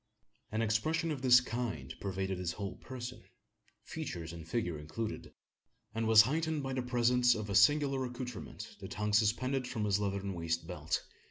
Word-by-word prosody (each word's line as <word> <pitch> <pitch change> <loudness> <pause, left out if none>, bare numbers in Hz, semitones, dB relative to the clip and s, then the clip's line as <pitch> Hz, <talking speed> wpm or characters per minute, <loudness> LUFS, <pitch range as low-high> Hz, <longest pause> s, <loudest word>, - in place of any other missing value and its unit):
An 110 +1 0
expression 155 +10 +1
of 140 -4 -3
this 125 -2 +8
kind 110 - -4
pervaded 95 -1 -2
his 90 -1 -2
whole 100 -3 -5
person 125 -1 -7 0.6
features 85 -1 -5
and 85 -1 -9
figure 90 -6 -1
included 105 +9 -5 0.6
and 115 0 -1
was 110 0 +9
heightened 155 +3 0
by 135 0 -3
the 130 - 0
presence 125 0 +3
of 105 -2 -4
a - - -1
singular 140 +3 +4
accoutrement 125 -2 -7
that - - -7
hung 105 0 -1
suspended 125 +5 +2
from 110 -4 -2
his 100 -1 +2
leathern 100 -1 -2
waist 85 -1 -2
belt. 80 -3 -2
110 Hz, 165 wpm, -33 LUFS, 95-125 Hz, 0.6 s, was